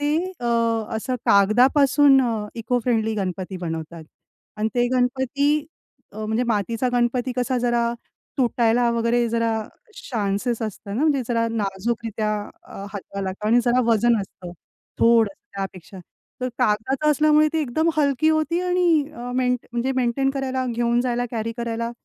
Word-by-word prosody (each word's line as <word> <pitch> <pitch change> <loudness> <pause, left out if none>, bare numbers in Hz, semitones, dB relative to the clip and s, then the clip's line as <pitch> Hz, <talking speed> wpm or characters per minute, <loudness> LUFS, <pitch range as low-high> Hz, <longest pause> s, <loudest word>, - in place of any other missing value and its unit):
ते 290 +1 +1 0.3
अ, - - -6 0.5
असं 255 +3 -3
कागदापासून 270 +7 +5
अ, 225 -4 -2
इको 235 +2 -1
फ्रेंडली 225 -3 +1
गणपती 185 -1 -4
बनवतात 165 -1 -5 0.5
आणि 215 +1 0
ते 245 0 +2
गणपती 265 +4 +1 0.5
अ, 215 0 -6
म्हणजे 220 +3 0
मातीचा 230 +3 0
गणपती 245 +1 0
कसा 250 0 0
जरा 235 -1 +1 0.5
तुटायला 240 -1 +2
वगैरे 235 0 +1
जरा 230 0 0 0.6
चान्सेस 220 +2 -1
असतं 210 -1 -5
ना, - - -1
म्हणजे 290 -4 +2
जरा 230 -1 +1
नाजूकरित्या 215 +1 -2 0.3
अ, 195 - -9
हाताला 195 -1 -5 0.2
आणि 235 +3 +4
जरा 245 +1 +3
वजन 230 +1 +3
असतं, 180 -2 -9 0.5
थोडंसं 230 -3 +3 0.2
त्यापेक्षा. 190 -1 -7 0.4
तर 255 - -1
कागदाचं 265 +8 +1
असल्यामुळे 305 +1 +4
ती 320 - 0
एकदम 310 +4 0
हलकी 285 0 +2
होती 315 +2 +1
आणि 355 -4 +2
अ, 245 -1 -6
मेंट 250 -1 +1
म्हणजे 240 +3 -1
मेंटेन 255 +2 +1
करायला, 260 -1 -2
घेऊन 235 0 +1
जायला, 245 -1 -1
कॅरी 230 -1 -3
करायला 230 0 -3
240 Hz, 140 wpm, -23 LUFS, 220-260 Hz, 0.6 s, कागदापासून